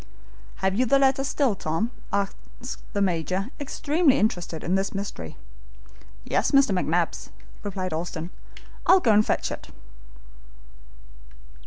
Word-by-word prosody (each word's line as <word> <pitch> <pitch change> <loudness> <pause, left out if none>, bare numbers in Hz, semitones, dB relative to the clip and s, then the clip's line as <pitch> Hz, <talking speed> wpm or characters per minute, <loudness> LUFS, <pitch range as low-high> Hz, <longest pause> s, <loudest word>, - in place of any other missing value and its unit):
"Have 190 - +3
you 250 +5 +2
the 275 - +5
letter 270 0 +3
still, 275 -3 +1
Tom?" 190 +6 -2 0.2
asked 200 +5 -4
the 200 - +2
Major, 185 - -1
extremely 290 +1 +2
interested 175 -6 -1
in 175 - 0
this 195 +1 0
mystery. 195 - -5 0.9
"Yes, - - +1
Mr. 275 -5 +5
McNabbs," 175 -2 0 0.3
replied 185 -3 -3
Austin. 165 +1 -4 0.6
"I'll 380 - +8
go 240 -10 +3
and 210 +1 +6
fetch - - -1
it." - - -7
200 Hz, 125 wpm, -25 LUFS, 180-260 Hz, 0.9 s, I'll